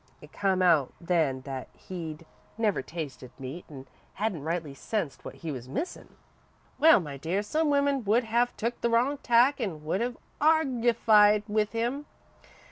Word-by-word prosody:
It -, -, -15 dB
come 190 Hz, -2 st, +1 dB
out 160 Hz, -7 st, +3 dB
then 160 Hz, -7 st, 0 dB
that 135 Hz, -1 st, -6 dB
he'd 165 Hz, -3 st, -7 dB, 0.3 s
never 215 Hz, -7 st, +1 dB
tasted 140 Hz, -4 st, -7 dB
meat 135 Hz, +6 st, -7 dB
an' 135 Hz, -3 st, -10 dB, 0.3 s
hadn't 200 Hz, -6 st, -2 dB
rightly 160 Hz, -1 st, -3 dB
sensed 165 Hz, 0 st, -4 dB
what -, -, -8 dB
he 165 Hz, -, -6 dB
was 130 Hz, -2 st, -7 dB
missin'. 325 Hz, -, -5 dB, 0.6 s
"Well, 320 Hz, -3 st, +7 dB
my 145 Hz, -6 st, -6 dB
dear, 175 Hz, +8 st, -1 dB
some 310 Hz, +8 st, 0 dB
women 280 Hz, -2 st, +2 dB
would 225 Hz, +5 st, +3 dB
have 235 Hz, +2 st, 0 dB
took 235 Hz, +2 st, -3 dB
the 235 Hz, -, +1 dB
wrong 250 Hz, +5 st, +2 dB
tack 250 Hz, +2 st, +3 dB
an' 160 Hz, -9 st, -4 dB
would 185 Hz, +7 st, 0 dB
have 245 Hz, 0 st, -2 dB, 0.2 s
argyfied 235 Hz, -8 st, +4 dB
with 215 Hz, 0 st, 0 dB
him. 245 Hz, +6 st, -2 dB
205 Hz, 160 wpm, -28 LUFS, 160-240 Hz, 0.6 s, Well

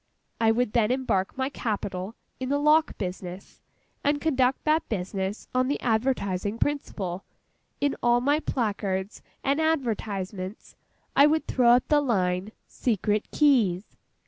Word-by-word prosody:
I 225 Hz, -1 st, +4 dB
would 240 Hz, -1 st, 0 dB
then 225 Hz, -3 st, +3 dB
embark 250 Hz, -7 st, 0 dB
my 265 Hz, 0 st, 0 dB
capital 205 Hz, -5 st, -4 dB, 0.2 s
in 260 Hz, 0 st, -3 dB
the 285 Hz, -, +2 dB
lock 305 Hz, +2 st, +3 dB
business, 185 Hz, -1 st, -6 dB, 0.4 s
and 290 Hz, 0 st, +2 dB
conduct 265 Hz, -4 st, +1 dB
that 315 Hz, +1 st, +1 dB
business 195 Hz, 0 st, -3 dB
on 255 Hz, 0 st, +2 dB
the 285 Hz, -, -1 dB
advertising 220 Hz, -4 st, 0 dB
principle. 200 Hz, -11 st, -2 dB, 0.6 s
In 285 Hz, -1 st, +1 dB
all 240 Hz, 0 st, +4 dB
my 285 Hz, +4 st, +2 dB
placards 205 Hz, -7 st, -2 dB, 0.2 s
and 280 Hz, +3 st, +1 dB
advertisements, 210 Hz, -10 st, -2 dB, 0.4 s
I 285 Hz, -, +7 dB
would 310 Hz, +1 st, +1 dB
throw 245 Hz, -2 st, +3 dB
up 245 Hz, -, +3 dB
the 295 Hz, -1 st, +4 dB
line 190 Hz, -6 st, 0 dB
SECRET 210 Hz, -2 st, -1 dB
KEYS. 225 Hz, -, +2 dB
230 Hz, 135 wpm, -26 LUFS, 195-275 Hz, 0.6 s, I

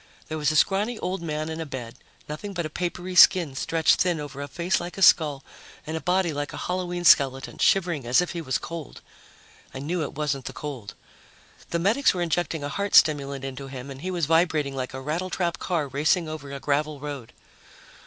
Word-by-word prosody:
There 155 Hz, -, -3 dB
was 150 Hz, 0 st, +2 dB
a -, -, -2 dB
scrawny 205 Hz, +8 st, +2 dB
old 185 Hz, -2 st, -3 dB
man 155 Hz, -2 st, -3 dB
in 160 Hz, 0 st, -4 dB
a -, -, -3 dB
bed, 120 Hz, -4 st, -6 dB, 0.3 s
nothing 175 Hz, +7 st, -6 dB
but 170 Hz, -2 st, -2 dB
a 155 Hz, -, -5 dB
papery 180 Hz, +2 st, -4 dB
skin 175 Hz, -4 st, +6 dB
stretched 160 Hz, +3 st, +2 dB
thin 175 Hz, -3 st, +1 dB
over 140 Hz, -1 st, -7 dB
a 145 Hz, -, -5 dB
face 170 Hz, +7 st, -1 dB
like 175 Hz, +2 st, -7 dB
a -, -, -5 dB
skull 150 Hz, -6 st, +5 dB, 0.4 s
and 155 Hz, -, -4 dB
a 160 Hz, -, -3 dB
body 180 Hz, -2 st, +1 dB
like 145 Hz, 0 st, -4 dB
a -, -, -6 dB
Halloween 180 Hz, -1 st, -3 dB
skeleton, 135 Hz, -4 st, +4 dB
shivering 170 Hz, -9 st, +2 dB
as 125 Hz, -, +4 dB
if 180 Hz, -, 0 dB
he 170 Hz, -, -4 dB
was 130 Hz, -5 st, -1 dB
cold. 165 Hz, -3 st, -8 dB, 0.7 s
I -, -, -4 dB
knew 160 Hz, +6 st, -2 dB
it 150 Hz, -, -4 dB
wasn't 140 Hz, -3 st, -2 dB
the -, -, -6 dB
cold. 130 Hz, -9 st, -7 dB, 0.7 s
The 170 Hz, -, 0 dB
medics 210 Hz, +8 st, +2 dB
were 175 Hz, -, 0 dB
injecting 165 Hz, -2 st, -1 dB
a 145 Hz, -, -3 dB
heart 200 Hz, +7 st, -2 dB
stimulant 140 Hz, -3 st, +4 dB
into 135 Hz, +1 st, -6 dB
him 135 Hz, 0 st, -8 dB
and 135 Hz, 0 st, -9 dB
he 185 Hz, -, -4 dB
was 175 Hz, -4 st, 0 dB
vibrating 155 Hz, -3 st, +2 dB
like 130 Hz, -1 st, -4 dB
a 130 Hz, -, -6 dB
rattletrap 170 Hz, +3 st, -2 dB
car 165 Hz, -6 st, -1 dB
racing 155 Hz, +5 st, +1 dB
over 155 Hz, -3 st, -7 dB
a 140 Hz, -, -5 dB
gravel 150 Hz, +1 st, -1 dB
road. 140 Hz, -5 st, -7 dB
155 Hz, 210 wpm, -25 LUFS, 140-175 Hz, 0.7 s, skin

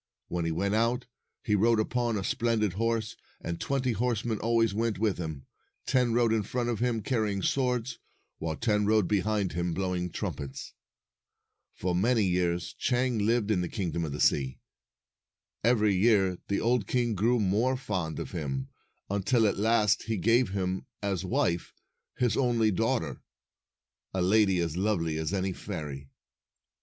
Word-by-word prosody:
When 85 Hz, -1 st, -2 dB
he 85 Hz, -, 0 dB
went 100 Hz, +5 st, 0 dB
out, 115 Hz, +3 st, +1 dB, 0.4 s
he 105 Hz, -, 0 dB
rode 115 Hz, +2 st, +4 dB
upon 120 Hz, 0 st, 0 dB
a 95 Hz, -, -3 dB
splendid 115 Hz, -4 st, 0 dB
horse, 115 Hz, +1 st, -1 dB, 0.2 s
and 85 Hz, 0 st, -4 dB
twenty 135 Hz, -2 st, 0 dB
horsemen 115 Hz, -1 st, -1 dB
always 115 Hz, -1 st, +2 dB
went 115 Hz, 0 st, 0 dB
with 105 Hz, -2 st, 0 dB
him. 80 Hz, -5 st, -5 dB, 0.4 s
Ten 125 Hz, -3 st, +2 dB
rode 115 Hz, -1 st, +3 dB
in 110 Hz, -, +2 dB
front 120 Hz, +4 st, -2 dB
of 115 Hz, -, -1 dB
him, 120 Hz, -3 st, 0 dB
carrying 105 Hz, -6 st, 0 dB
swords, 125 Hz, -2 st, 0 dB, 0.4 s
while 80 Hz, -1 st, -2 dB
ten 105 Hz, +1 st, +1 dB
rode 110 Hz, -3 st, +3 dB
behind 105 Hz, -2 st, 0 dB
him, 85 Hz, 0 st, -1 dB
blowing 90 Hz, -2 st, -1 dB
trumpets. 70 Hz, -4 st, -5 dB, 1.0 s
For 90 Hz, -1 st, -1 dB
many 110 Hz, +5 st, +2 dB
years 90 Hz, -2 st, 0 dB
Chang 125 Hz, -2 st, 0 dB
lived 110 Hz, 0 st, +1 dB
in 95 Hz, -4 st, +2 dB
the 90 Hz, -, -3 dB
Kingdom 85 Hz, -4 st, -2 dB
of 80 Hz, -, -3 dB
the 70 Hz, -, -5 dB
Sea. 65 Hz, -2 st, +2 dB, 1.1 s
Every 110 Hz, -3 st, +3 dB
year 95 Hz, -2 st, +3 dB
the 100 Hz, -, 0 dB
old 120 Hz, -3 st, +1 dB
king 120 Hz, -2 st, +1 dB
grew 115 Hz, +5 st, +2 dB
more 110 Hz, +6 st, +1 dB
fond 90 Hz, -, -3 dB
of -, -, -5 dB
him, 70 Hz, -5 st, -3 dB, 0.4 s
until 100 Hz, +4 st, +2 dB
at 105 Hz, -, +1 dB
last 105 Hz, -1 st, +3 dB
he 110 Hz, -1 st, -1 dB
gave 115 Hz, +6 st, +3 dB
him, 95 Hz, -1 st, -2 dB, 0.2 s
as 95 Hz, -3 st, -1 dB
wife, 85 Hz, -2 st, -1 dB, 0.4 s
his 125 Hz, -2 st, +2 dB
only 120 Hz, -4 st, +2 dB
daughter, 90 Hz, -, -1 dB, 0.9 s
a 95 Hz, -, +1 dB
lady 95 Hz, 0 st, +4 dB
as 85 Hz, -2 st, -2 dB
lovely 85 Hz, -5 st, 0 dB
as 80 Hz, +1 st, -2 dB
any 95 Hz, -1 st, -1 dB
fairy. 75 Hz, -9 st, -6 dB
105 Hz, 160 wpm, -29 LUFS, 90-115 Hz, 1.1 s, rode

